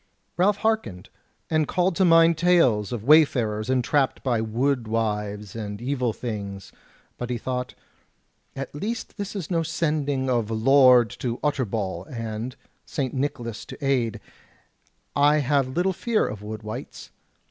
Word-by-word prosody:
Ralph 200 +3 +3
hearkened, 215 - -2 0.4
and 155 -2 +1
called 180 0 +1
to 190 - +4
mind 165 -1 +6
tales 155 - +3
of 120 -4 -4
way 155 +5 +8
farers 110 -5 -2
entrapped 130 +2 +1
by 120 -4 +1
wood 120 +2 0
wives 105 -2 -2
and 105 -2 -5
evil 125 -1 -1
things; 100 -4 -6 0.5
but 125 - -4
he 125 - -1
thought: 125 +1 -4 0.8
"At 135 0 -6
least 215 +12 -5
this 200 0 -5
is 190 -3 -5
no 165 -2 +2
sending 150 -4 -1
of 120 -4 +1
the 110 - -3
Lord 125 -1 +5
of 120 -1 -1
Utterbol, 110 - -1
and, 115 +1 -5 0.3
St. 135 -5 -3
Nicholas 120 -4 -3
to 145 - -8
aid, 120 -5 +1 1.0
I 145 +1 +5
have 140 -2 +2
little 175 +8 0
fear 225 +4 0
of 105 -1 -6
wood 105 +1 -7
wights. 110 0 -8
130 Hz, 145 wpm, -24 LUFS, 110-150 Hz, 1.0 s, way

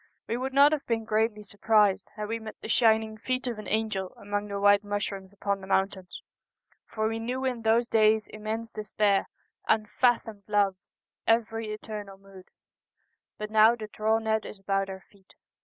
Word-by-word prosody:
We 230 - -1
would 260 +2 -3
not 280 +2 +6
have 305 -2 -1
been 225 -2 -1
greatly 215 0 0
surprised 205 -1 +2
had 210 -1 -4
we 225 +1 -3
met 220 -1 -8
the - - -8
shining 220 -1 +3
feet 255 +3 -2
of 235 -4 -3
an 215 - -8
angel 210 -4 -2
among 205 0 -3
the 200 -1 -4
white 205 0 +5
mushrooms 200 -2 -4
upon 200 0 -2
the 190 - -10
mountains, 190 -1 -1 0.6
for 220 -1 -1
we 225 0 -2
knew 250 +3 -3
in 250 -3 -1
those 225 +2 +3
days 215 -1 +3
immense 220 +1 -5
de 215 - -4
spair, 210 -1 +1 0.4
unfathomed 220 -1 +1
love 200 -2 +2 0.3
— - - -56
every 225 -1 -6
eternal 210 -2 -7
mood, 195 -1 -15 0.5
— - - -50
but 210 0 -6
now 220 +2 +6
the 220 -2 -7
draw 220 +1 +1
net 220 -1 0
is - - -9
about 195 0 -1
our 190 0 -7
feet. 195 -1 -24
215 Hz, 185 wpm, -28 LUFS, 200-225 Hz, 0.6 s, not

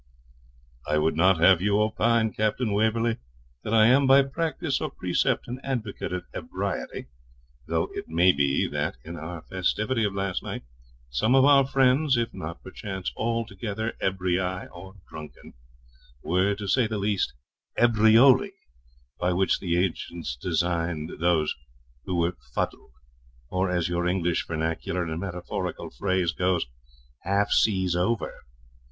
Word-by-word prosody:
'I 75 0 +1
would 75 0 +1
not 90 +3 +4
have 90 +1 +6
you 100 +1 +2
opine, 110 +1 +2
Captain 110 +1 0
Waverley, 110 +2 +1 0.5
that - - -4
I 110 -1 +6
am 135 +4 +5
by 135 +1 +7
practice 155 +1 -2
or - - -2
precept 90 -1 -1
an 125 +2 -6
advocate 120 -7 -3
of 90 -1 -4
ebriety, - - -4 0.6
though - - 0
it - - -6
may 85 +3 +5
be 70 -2 +1
that, 75 +5 -2
in 85 +2 -7
our 80 +1 -7
festivity 110 +7 -1
of 100 -2 -1
last 95 -1 -2
night, - - -6 0.5
some 110 - +2
of 135 0 +6
our 140 -2 +6
friends, 135 +1 +3
if 115 -1 -1
not 80 +2 -7
perchance 95 -1 -5
altogether 110 -1 -3
ebrii, 95 -1 0 0.3
or 95 +3 -11
drunken, 75 -1 -11 0.7
were, 95 +4 +1
to 100 0 -6
say 120 +4 +3
the 110 -1 -3
least, 100 -1 0 0.4
ebrioli, 120 - +5 0.7
by 90 +1 +1
which 95 +2 +1
the 85 -2 -1
ancients 85 -5 -2
designed 85 +1 -1
those 80 -2 +2 0.5
who 90 - -2
were 85 +1 +1 0.2
fuddled, - - -3 0.6
or, 95 +1 0
as 90 -2 0
your 85 0 -1
English 90 -2 0
vernacular 80 +2 -2
and 80 -1 -4
metaphorical 90 -3 -5
phrase 90 +5 0
goes, 90 0 0 0.5
half 100 +2 0
seas 95 -5 +2
over. 100 +6 0
95 Hz, 140 wpm, -26 LUFS, 85-110 Hz, 0.7 s, by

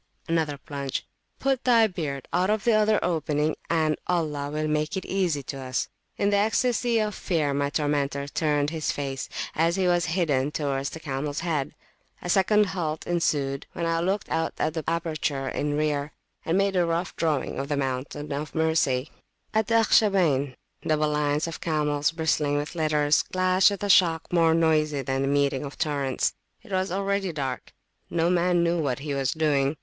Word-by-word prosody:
(another 160 -3 0
plunge)put 145 - -4
thy 235 -3 +5
beard 150 - -4
out 180 +2 +2
of 215 -1 +1
the 235 - +3
other 215 0 +3
opening, 155 -2 0
and 155 -2 +2
Allah 150 -5 -1
will 155 +1 -2
make 155 +3 -1
it 190 - -4
easy 175 -7 0
to 135 +1 -6
us. 130 -1 -2 0.3
In 200 - +1
the 205 - +3
ecstasy 235 +3 +2
of 215 -1 0
fear 155 -7 -1
my 140 0 0
tormentor 145 -1 -1
turned 145 -1 0
his 160 -2 -1
face, 135 -2 -4 0.2
as 165 +2 +2
he 190 -1 +1
was 175 -1 +2
bidden, 145 -7 +1
towards 140 -2 -2
the 160 - -8
camels 145 0 -3
head. 155 -5 -2 0.4
A 175 - -3
second 210 +3 +4
halt 160 -4 -3
ensued, 145 -5 0
when 170 - -3
I 165 0 +1
looked 190 +4 -1
out 165 0 -1
of 155 - 0
the 160 -1 -3
aperture 155 -4 -1
in 145 +2 -1
rear, 150 -1 -1 0.3
and 165 +3 +1
made 195 0 +1
a 180 - +4
rough 170 +1 -1
drawing 150 -6 -1
of 140 - -3
the 145 - 0
Mountain 140 +2 -3
of 145 +2 -4
Mercy. 160 -4 +1 0.4
At 220 -1 +1
the 230 - +2
Akhshabayn, 180 - +3 0.3
double 155 -1 +1
lines 150 0 0
of 165 -1 -6
camels, 150 -2 +1
bristling 155 -3 0
with 145 +3 -3
litters, 155 -3 +2
clashed 185 +1 +3
with 200 -1 -5
a - - 0
shock 165 -3 +4
more 165 -2 +4
noisy 155 -3 +2
than 135 +1 -1
the 135 - 0
meeting 140 -1 +1
of 140 0 -7
torrents. 140 -4 0 0.3
It 230 - -15
was 190 0 0
already 195 0 -1
dark: 135 -5 -4 0.4
no 170 +1 +1
man 175 -1 +2
knew 170 0 +1
what 135 -6 0
he 145 +1 -4
was 135 -1 0
doing. 150 -2 +1
155 Hz, 180 wpm, -26 LUFS, 145-175 Hz, 0.4 s, thy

